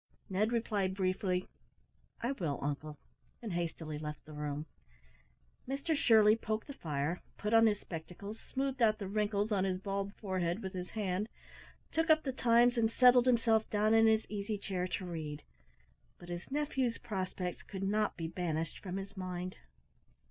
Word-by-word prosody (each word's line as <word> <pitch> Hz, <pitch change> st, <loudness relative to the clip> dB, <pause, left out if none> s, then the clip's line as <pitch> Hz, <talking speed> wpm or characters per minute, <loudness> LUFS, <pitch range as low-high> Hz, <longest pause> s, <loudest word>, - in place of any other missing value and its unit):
Ned 210 Hz, +4 st, +2 dB
replied 205 Hz, -5 st, 0 dB
briefly, 185 Hz, -1 st, 0 dB, 0.7 s
"I 240 Hz, -, 0 dB
will, 165 Hz, -, -2 dB
uncle," 145 Hz, +1 st, -3 dB, 0.4 s
and 220 Hz, -6 st, -5 dB
hastily 165 Hz, -3 st, -3 dB
left 150 Hz, 0 st, -6 dB
the 155 Hz, -, -11 dB
room. 150 Hz, 0 st, -3 dB, 1.0 s
Mr 280 Hz, +5 st, 0 dB
Shirley 220 Hz, -5 st, +6 dB
poked 220 Hz, -1 st, -2 dB
the 280 Hz, -, -7 dB
fire, 155 Hz, -, -2 dB, 0.2 s
put 210 Hz, +1 st, -2 dB
on 225 Hz, 0 st, +7 dB
his 205 Hz, -2 st, +1 dB
spectacles, 180 Hz, +6 st, -7 dB
smoothed 270 Hz, -1 st, -3 dB
out 215 Hz, -2 st, +5 dB
the 200 Hz, -3 st, -5 dB
wrinkles 210 Hz, +1 st, 0 dB
on 195 Hz, -3 st, +2 dB
his 190 Hz, -1 st, 0 dB
bald 200 Hz, +1 st, -3 dB
forehead 185 Hz, -1 st, -2 dB
with 190 Hz, 0 st, -4 dB
his 180 Hz, -1 st, -4 dB
hand, 205 Hz, 0 st, -1 dB, 0.6 s
took 325 Hz, +1 st, +1 dB
up 315 Hz, 0 st, +6 dB
the 265 Hz, -, -2 dB
Times, 240 Hz, 0 st, +4 dB
and 225 Hz, -1 st, +3 dB
settled 250 Hz, 0 st, +6 dB
himself 230 Hz, -3 st, +3 dB
down 215 Hz, +1 st, +3 dB
in 225 Hz, 0 st, +6 dB
his 220 Hz, 0 st, +4 dB
easy 210 Hz, +1 st, -3 dB
chair 185 Hz, -2 st, -2 dB
to 185 Hz, +1 st, -3 dB
read; 155 Hz, -4 st, -5 dB, 0.7 s
but 175 Hz, -, -12 dB
his 175 Hz, 0 st, -5 dB
nephew's 270 Hz, -4 st, 0 dB
prospects 185 Hz, -5 st, -3 dB
could 195 Hz, -1 st, -6 dB
not 210 Hz, +1 st, +1 dB
be 165 Hz, -2 st, -3 dB
banished 165 Hz, -2 st, -2 dB
from 185 Hz, -1 st, -5 dB
his 195 Hz, 0 st, -6 dB
mind. 185 Hz, -1 st, -4 dB
200 Hz, 165 wpm, -34 LUFS, 180-225 Hz, 1.0 s, on